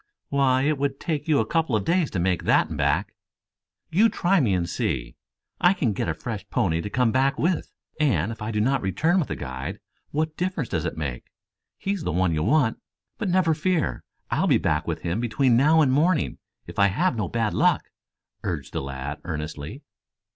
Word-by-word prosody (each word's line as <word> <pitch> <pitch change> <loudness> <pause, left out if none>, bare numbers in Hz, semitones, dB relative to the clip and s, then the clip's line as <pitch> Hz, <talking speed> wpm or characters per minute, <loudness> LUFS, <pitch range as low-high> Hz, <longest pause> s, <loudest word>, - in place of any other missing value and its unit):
"Why, 135 -2 +3
it 150 0 +1
would 140 -1 -1
take 155 -3 -3
you 145 -8 +3
couple 160 -1 +1
of 105 - 0
days 170 -3 +2
to 95 - -3
make 90 0 0
that - - +3
and - - -4
back." - - +1 0.8
"You 215 +7 +5
try 190 -1 +2
me 110 - +2
and 85 -1 -1
see. 65 -7 -2 0.4
I 180 +1 +5
can 120 - 0
get 95 - -2
a 80 - -1
fresh 105 +4 -5
pony 80 -3 +1
to 105 - -5
come 125 +1 +2
back 135 +3 +2
with, 170 +3 0 0.3
and 115 - +2
if 110 - -9
I 105 - -3
do 105 -2 -1
not 135 +6 +2
return 160 - +1
with 160 - 0
the - - -3
guide, 65 -1 -5 0.3
what 155 +1 -1
difference 175 -8 -2
does 80 - -1
it - - -3
make? 70 -6 -5 0.5
He's 195 -1 -2
the - - -2
one 90 0 +1
you 75 - 0
want. 130 - +2 0.4
But 205 - -1
never 175 -2 +3
fear, 165 +1 0 0.3
I'll - - +2
be - - +5
back 75 - 0
with - - -3
him 85 +5 -1
between 120 +1 +2
now 155 +6 +5
and 135 -4 +3
morning 160 +4 +2 0.3
if - - -7
I 100 - +6
have 125 - +1
no 105 -4 -1
bad 115 +2 -1
luck," - - +2 0.5
urged - - -4
the - - -1
lad 70 +1 -5
earnestly. 80 - -5
125 Hz, 205 wpm, -25 LUFS, -, 0.8 s, I